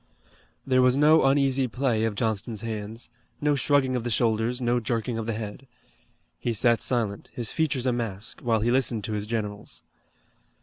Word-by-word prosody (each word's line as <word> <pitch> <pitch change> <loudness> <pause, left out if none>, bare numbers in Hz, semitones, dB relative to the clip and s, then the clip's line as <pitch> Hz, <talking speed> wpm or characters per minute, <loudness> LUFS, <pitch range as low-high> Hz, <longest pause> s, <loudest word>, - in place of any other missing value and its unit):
There 130 -1 +3
was 125 +1 +4
no 155 +2 +5
uneasy 135 -1 +3
play 120 -2 0
of 110 -2 -2
Johnston's 110 0 -2
hands, 110 +1 -6 0.3
no 150 0 +2
shrugging 135 -1 +2
of 125 - -1
the 120 - -2
shoulders, 115 +1 +1
no 120 -1 +1
jerking 115 -1 -2
of 110 - -4
the 115 - 0
head. 110 +4 -6 0.7
He 120 - -1
sat 115 +1 +2
silent, 110 -5 -1
his 120 -3 -4
features 145 -5 0
a 125 - +2
mask, 110 -4 -5
while 115 -2 +1
he 120 +2 +2
listened 120 -4 +1
to 110 - -3
his 105 0 -3
generals. 105 -2 -4
120 Hz, 175 wpm, -26 LUFS, 110-130 Hz, 0.7 s, no